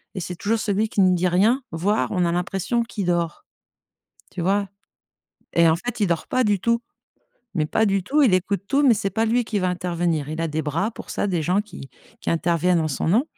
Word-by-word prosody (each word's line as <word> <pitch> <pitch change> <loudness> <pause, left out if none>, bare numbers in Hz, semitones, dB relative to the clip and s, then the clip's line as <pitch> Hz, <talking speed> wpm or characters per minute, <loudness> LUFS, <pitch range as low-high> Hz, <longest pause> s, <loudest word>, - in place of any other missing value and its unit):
et - - -3
c'est 180 +2 -5
toujours 220 +6 -1
celui 210 +1 0
qui 200 - +1
ne 185 -1 +4
dit 180 +1 +1
rien. 220 +9 +2
Voire, 195 +7 0
on 180 -2 +1
a 170 - +1
l'impression 190 +6 -1
qu'il 215 -4 -5
dort. 175 - -1 0.9
Tu 180 - -5
vois, 200 +3 +1 0.9
et 170 -1 +5
en 160 - +4
fait, 240 +5 -5
il 205 - +3
dort 170 -2 -1
pas 255 - +2
du 205 -2 +2
tout, 235 0 +1 0.7
mais 155 -3 0
pas 220 +7 +1
du 195 -2 +1
tout. 295 +9 +2
Il 240 -9 +4
écoute 195 +2 0
tout, 280 +1 +2
mais 245 - +6
c'est 195 -1 -2
pas 225 0 0
lui 240 +2 +2
qui 215 -2 -2
va 185 -1 0
intervenir. 175 -4 -1
Il 155 +1 -4
a 165 - -1
des 155 +1 -2
bras 165 +9 -1
pour - - -10
ça, - - -1
des 175 -5 -1
gens 180 +5 +2
qui 170 -10 -11 0.3
qui - - -2
interviennent 170 +1 +2
en 155 - 0
son 150 - -2
nom, 225 - +3
185 Hz, 235 wpm, -23 LUFS, 170-215 Hz, 0.9 s, mais